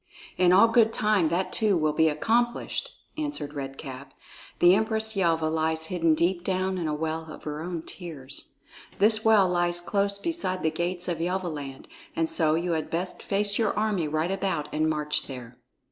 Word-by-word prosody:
"In 180 -1 +4
all 195 +5 +7
good 225 -1 +4
time 210 -7 +2
that 175 +3 -1
too 210 -4 +2
will 155 -1 +1
be 160 +1 +4
accomplished," 240 - 0 0.3
answered 290 - -4
Red 135 -2 -6
Cap. 135 -1 -9 0.4
"The 175 +1 +6
Empress 220 +1 0
Yelva 165 -4 +2
lies 160 0 0
hidden 165 -3 +3
deep 175 +2 +1
down 185 0 -1
in 165 - -2
a 150 - -1
well 160 +1 -3
of - - -11
her 150 0 -5
own 170 -1 -4
tears. 150 -8 -8 0.4
This 215 +2 +3
well 215 -4 +5
lies 175 -1 +1
close 200 +2 0
beside 255 - -3
the 160 - +2
gates 175 +2 -2
of 170 -2 -2
Yelvaland, 165 -7 -3 0.3
and 165 0 +1
so 155 -1 +2
you 170 +2 -1
had 160 -1 -2
best 180 +2 -3
face 205 +1 0
your 220 -3 +1
army 210 -6 0
right 155 +4 -1
about 190 -6 -2
and 155 +1 +1
march 150 -1 0
there." 125 -2 -9
175 Hz, 180 wpm, -26 LUFS, 155-200 Hz, 0.4 s, all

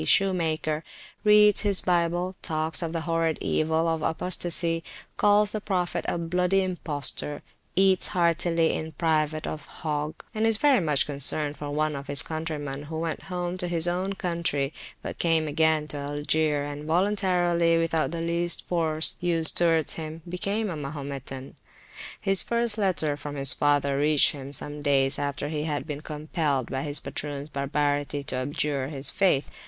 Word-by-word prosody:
shoemaker, 160 - +2 0.4
reads 210 -1 +6
his 200 -3 +2
bible, 175 +1 0
talks 160 +2 -2
of 165 -2 -3
the 165 -1 -2
horrid 165 -1 0
evil 160 +1 +1
of 165 -1 0
apostacy, 165 0 0 0.3
calls 205 0 +3
the 215 - -3
Prophet 180 -3 -1
a - - 0
bloody 180 +3 +1
imposter, 150 -5 0 0.3
eats 190 -1 +4
heartily 170 -1 +2
in 160 0 -4
private 155 -2 0
of 150 -2 -5
hog, 150 -1 -4
and 220 0 +1
is 225 -1 +6
very 280 -1 +4
much 150 -5 +1
concerned 145 +1 -1
for 145 0 -6
one 150 +1 -1
of 140 0 -7
his 145 +1 +3
countrymen 150 -3 -4
who 160 +2 -6
went 165 -1 -3
home 180 -1 -4
to 180 - -1
his 170 -1 +1
own 185 +3 -1
country, 170 -6 -1 0.3
but - - -6
came 165 -2 +2
again 155 0 +2
to 150 - -5
Algier, 145 +1 0
and 145 +1 -6
voluntarily, 175 -1 +2
without 165 -1 +1
the 165 0 -4
least 170 +1 0
force 160 -2 +2
used 165 -2 +2
towards 165 -3 +3
him, 160 0 -7
became 200 +4 -2
a - - -4
Mahometan. 140 -2 -6 0.7
His 195 -1 +5
first 235 -2 0
letter 180 -8 0
from 145 0 -7
his 135 -2 +4
father 140 -1 +1
reached 150 0 +5
him 140 -1 -8
some 145 +1 -5
days 135 -1 +2
after 145 0 -3
he 150 -1 -2
had 150 -2 -2
been 150 -2 -5
compelled 150 -3 -2
by 130 - -2
his 145 0 -2
patroons 145 0 -5
barbarity 145 0 -1
to 130 - -3
abjure 140 +1 -2
his 140 -1 -2
faith. 180 -8 +2
160 Hz, 160 wpm, -26 LUFS, 145-175 Hz, 0.7 s, reads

